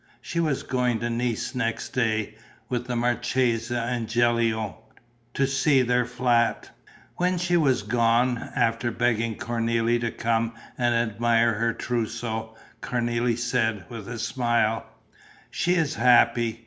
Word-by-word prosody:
She 170 Hz, -, -4 dB
was 150 Hz, -4 st, 0 dB
going 125 Hz, -2 st, 0 dB
to 120 Hz, 0 st, -1 dB
Nice 120 Hz, -1 st, -2 dB
next 115 Hz, -3 st, -2 dB
day, 110 Hz, -3 st, -1 dB, 0.4 s
with 125 Hz, -1 st, -2 dB
the 125 Hz, -, -2 dB
marchesa 120 Hz, 0 st, 0 dB
and 120 Hz, -1 st, -2 dB
Gilio, 115 Hz, -2 st, +1 dB, 0.6 s
to 140 Hz, -, +2 dB
see 135 Hz, 0 st, +3 dB
their 125 Hz, 0 st, +1 dB
flat. 120 Hz, -2 st, +1 dB, 0.5 s
When 180 Hz, +1 st, +1 dB
she 175 Hz, 0 st, 0 dB
was 135 Hz, -9 st, +2 dB
gone, 120 Hz, +2 st, +2 dB, 0.2 s
after 115 Hz, 0 st, +1 dB
begging 115 Hz, -1 st, 0 dB
Cornélie 115 Hz, 0 st, 0 dB
to 120 Hz, -, 0 dB
come 115 Hz, 0 st, -1 dB, 0.2 s
and 120 Hz, -1 st, +1 dB
admire 115 Hz, 0 st, +2 dB
her 115 Hz, +2 st, 0 dB
trousseau, 115 Hz, -2 st, -3 dB, 0.3 s
Cornélie 120 Hz, -1 st, 0 dB
said, 110 Hz, -5 st, 0 dB
with 115 Hz, -4 st, -8 dB
a 120 Hz, -, -5 dB
smile: 115 Hz, -2 st, 0 dB, 0.6 s
"She 175 Hz, +1 st, +1 dB
is 160 Hz, -3 st, +1 dB
happy. 120 Hz, -2 st, +3 dB
120 Hz, 135 wpm, -25 LUFS, 115-125 Hz, 0.6 s, see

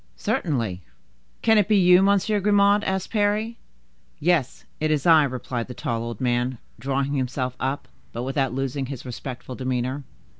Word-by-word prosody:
"Certainly." 115 Hz, -, -1 dB, 0.6 s
"Can 220 Hz, -1 st, +5 dB
it 200 Hz, -, +2 dB
be 210 Hz, -1 st, +4 dB
you, 180 Hz, -1 st, +6 dB
Monsieur 200 Hz, +2 st, +2 dB
Grimaud?" 205 Hz, +1 st, +4 dB
asked 190 Hz, -1 st, -2 dB
Parry. 215 Hz, +2 st, 0 dB, 0.6 s
"Yes, 160 Hz, -5 st, +1 dB
it 155 Hz, -, 0 dB
is 150 Hz, -3 st, 0 dB
I," 165 Hz, -2 st, +7 dB
replied 125 Hz, -2 st, -4 dB
the 125 Hz, -, -8 dB
tall 115 Hz, -1 st, -2 dB
old 115 Hz, -2 st, -5 dB
man, 125 Hz, 0 st, 0 dB, 0.2 s
drawing 135 Hz, +3 st, -1 dB
himself 130 Hz, -1 st, -2 dB
up, 135 Hz, +2 st, -2 dB, 0.2 s
but 120 Hz, -, -4 dB
without 135 Hz, -1 st, 0 dB
losing 135 Hz, +1 st, -2 dB
his 135 Hz, -2 st, -7 dB
respectful 125 Hz, +1 st, -7 dB
demeanor. 130 Hz, +2 st, -2 dB
135 Hz, 155 wpm, -24 LUFS, 125-190 Hz, 0.6 s, I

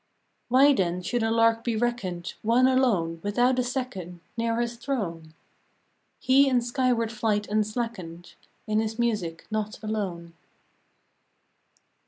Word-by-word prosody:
" -, -, -47 dB
Why 270 Hz, +4 st, +6 dB
then 180 Hz, -5 st, -1 dB
should 240 Hz, +5 st, -1 dB
a 225 Hz, -, +1 dB
lark 230 Hz, 0 st, +3 dB
be 235 Hz, -2 st, -1 dB
reckoned 215 Hz, -7 st, -2 dB
One 235 Hz, +4 st, +3 dB
alone, 210 Hz, -11 st, +1 dB
without 245 Hz, +5 st, +2 dB
a -, -, +2 dB
second 245 Hz, -9 st, -4 dB, 0.2 s
Near 230 Hz, 0 st, 0 dB
his 240 Hz, 0 st, -2 dB
throne? 170 Hz, -, -4 dB, 0.8 s
He 275 Hz, +1 st, +4 dB
in 250 Hz, -2 st, +3 dB
skyward 240 Hz, -2 st, 0 dB
flight 215 Hz, -2 st, 0 dB
unslackened, 215 Hz, -5 st, -3 dB, 0.3 s
In 215 Hz, 0 st, +1 dB
his 220 Hz, 0 st, -2 dB
music, 210 Hz, -9 st, -1 dB
not 215 Hz, 0 st, -2 dB
alone." 185 Hz, -6 st, -4 dB
225 Hz, 130 wpm, -26 LUFS, 190-245 Hz, 0.8 s, Why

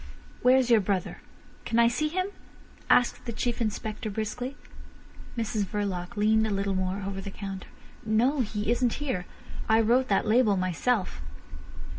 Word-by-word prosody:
"Where's 250 Hz, 0 st, +4 dB
your 225 Hz, -2 st, +6 dB
brother? 190 Hz, -2 st, -2 dB, 0.4 s
Can 230 Hz, -, -1 dB
I 235 Hz, 0 st, +6 dB
see 275 Hz, +6 st, 0 dB
him?" 370 Hz, +5 st, -1 dB, 0.6 s
asked 245 Hz, 0 st, +3 dB
the 235 Hz, -, -3 dB
Chief 240 Hz, +1 st, -2 dB
Inspector 215 Hz, 0 st, -3 dB
briskly. 225 Hz, +6 st, -4 dB, 0.8 s
Mrs 220 Hz, -2 st, -1 dB
Verloc 195 Hz, -2 st, -3 dB
leaned 220 Hz, +1 st, +3 dB
a -, -, -2 dB
little 200 Hz, 0 st, 0 dB
more 185 Hz, +1 st, -2 dB
over 195 Hz, 0 st, -4 dB
the 200 Hz, -, -6 dB
counter. 195 Hz, -1 st, -7 dB, 0.4 s
"No. 235 Hz, +7 st, +2 dB
He 215 Hz, -2 st, -1 dB
isn't 240 Hz, -1 st, +2 dB
here. 255 Hz, -12 st, -3 dB, 0.4 s
I 220 Hz, 0 st, +5 dB
wrote 240 Hz, +4 st, +3 dB
that 195 Hz, -, +2 dB
label 215 Hz, -2 st, +4 dB
myself." 185 Hz, -, 0 dB
220 Hz, 150 wpm, -27 LUFS, 200-245 Hz, 0.8 s, your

